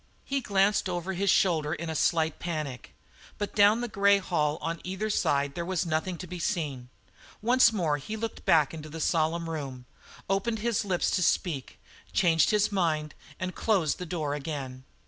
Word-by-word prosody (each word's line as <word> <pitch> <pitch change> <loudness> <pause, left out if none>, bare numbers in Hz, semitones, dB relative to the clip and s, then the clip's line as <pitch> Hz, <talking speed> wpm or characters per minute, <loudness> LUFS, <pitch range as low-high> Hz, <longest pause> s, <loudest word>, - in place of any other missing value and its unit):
He 275 0 -1
glanced 200 -2 +2
over 175 +1 -3
his 195 +2 0
shoulder 160 -6 +3
in 170 - -6
a 160 - -2
slight 160 -1 +1
panic, 155 -7 -5 0.4
but 205 - -3
down 210 +3 +5
the 245 - -2
grey 200 -1 +4
hall 155 -6 0
on 165 0 -4
either 190 +4 -3
side 140 -6 +1
there 170 - -3
was 185 0 -1
nothing 165 +2 -1
to 185 - -7
be 180 0 -7
seen. 145 -10 -2 0.5
Once 240 +1 +5
more 165 -9 0
he 215 +11 -6
looked 225 0 -5
back 155 -2 +4
into 155 -1 -8
the 160 +2 -7
solemn 165 +1 +1
room, 135 -6 -5 0.4
opened 195 +4 0
his 225 0 0
lips 185 -4 0
to - - +1
speak, 160 -6 0 0.3
changed 165 -3 +4
his 210 0 +2
mind, 160 -6 0 0.3
and 185 0 -3
closed 190 -9 +1
the 180 - -5
door 155 -4 -2
again. 135 -3 -5
170 Hz, 180 wpm, -28 LUFS, 155-200 Hz, 0.5 s, down